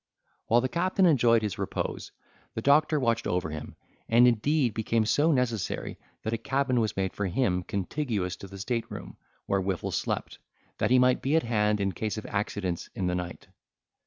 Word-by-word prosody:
While 120 +2 +4
the 130 - 0
captain 185 +6 +1
enjoyed 120 -8 +4
his 105 -3 -3
repose - - -3 0.4
the 110 - -2
doctor 150 +2 +4
watched 115 -3 0
over 90 -3 -1
him, 75 -1 -7 0.3
and 120 +2 +6
indeed 125 +2 +2
became 110 0 0
so 150 +8 +3
necessary, 120 - -1 0.2
that 110 - -2
a 115 - -1
cabin 135 +1 0
was 110 -3 -1
made 95 -1 -1
for 100 - -2
him 90 -2 +1
contiguous 100 - -2
to 100 - -9
the 100 +1 -10
state 115 +4 -2
room - - -8 0.3
where 100 -1 +1
Whiffle 95 -2 -2
slept, - - -3 0.4
that 110 - +2
he 130 - +5
might 125 0 +4
be 140 +4 +1
at 160 - +3
hand 105 -2 +1
in 100 -1 0
case 110 +3 -3
of 110 - -6
accidents 100 -3 -3
in 95 - -2
the 90 - 0
night. 90 -1 -5
110 Hz, 190 wpm, -28 LUFS, 95-130 Hz, 0.4 s, and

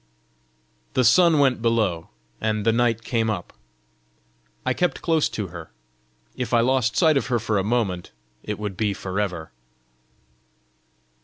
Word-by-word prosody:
The 130 - +2
sun 160 +7 +5
went 135 -5 +3
below, 110 -8 0 0.3
and 110 -1 -1
the 115 - +5
night 115 -1 +1
came 115 -2 0
up. 95 -5 -4 1.1
I - - +2
kept 175 -6 -1
close 160 -3 +2
to 100 -4 -4
her: 85 -2 -9 0.7
if 125 -1 -1
I - - +5
lost 125 -2 +1
sight 160 -4 +4
of 135 - -1
her 125 -2 +1
for 110 -2 0
a - - 0
moment, 105 -5 -1 0.3
it 105 - -4
would 105 -2 -5
be 105 0 -1
for 95 +2 -4
ever! 90 -6 -3
115 Hz, 150 wpm, -23 LUFS, 100-125 Hz, 1.1 s, sun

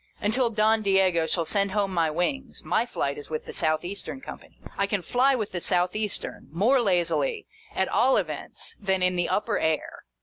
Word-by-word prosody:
Until 235 +4 +1
Don 220 0 +2
Diego 190 -5 +3
shall 170 -1 0
send 200 +2 +1
home 200 -2 0
my 165 -3 +2
wings, 230 - -2
my 235 - +1
flight 140 -10 -2
is 145 - -12
with 155 -1 -4
the - - -8
South 155 +2 0
Eastern 200 +8 -5
Company. - - -11 0.2
I 200 - +1
can 200 -2 -1
fly 265 +6 +3
with 215 -5 -3
the 175 - -3
South 180 +1 +1
Eastern, 210 -1 -3
more 230 - +3
lazily, 170 - 0 0.3
at 190 - +1
all 260 +3 +3
events, - - -4
than 190 -2 0
in 180 0 +3
the 175 -1 0
upper 210 +1 0
air. 160 -1 -2
195 Hz, 195 wpm, -26 LUFS, 175-220 Hz, 0.3 s, Diego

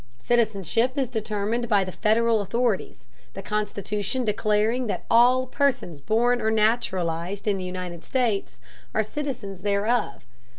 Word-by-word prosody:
Citizenship 225 - +1
is 270 -2 +1
determined 220 0 -2
by 205 -3 +4
the 185 - -5
Federal 225 +2 +2
authorities, 225 +1 -1 0.3
the - - -6
Constitution 210 +3 -2
declaring 215 +3 +1
that - - -3
all 250 +2 +5
persons 255 - -1
born 240 - +2
or 220 - +1
naturalized 200 -4 0
in 200 -2 +2
the 185 - -5
United 180 -2 -6
States 230 -3 -1 0.4
are 220 - +3
citizens 215 -6 -5
thereof. 205 +4 0
215 Hz, 130 wpm, -25 LUFS, 200-240 Hz, 0.4 s, all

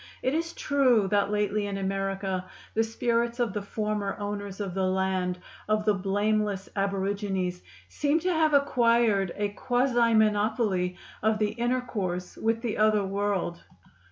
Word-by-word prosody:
It 260 - +1
is 330 +2 -1
true 255 -10 +3
that 200 0 +2
lately, 210 0 0
in 200 -1 -3
America, 195 -1 -2 0.3
the 225 - +2
spirits 235 +1 -1
of 235 -5 0
the 210 - -2
former 210 0 -2
owners 205 -1 -5
of 195 -3 -3
the 190 0 0
land, 185 -1 0 0.3
of 215 0 +1
the 210 - +4
blameless 205 +1 0
aborigines, 195 -2 -1 0.3
seem 290 - +1
to 365 +1 +1
have 315 -2 +3
acquired 235 -8 +3
a 205 0 -1
quasi 240 +1 +2
monopoly 210 -4 +2 0.2
of 220 0 +2
the 215 -1 +1
intercourse 220 -7 -2
with 225 +1 -1
the 230 -3 -2
other 215 -1 +3
world. 195 -3 -1
210 Hz, 145 wpm, -27 LUFS, 195-230 Hz, 0.3 s, the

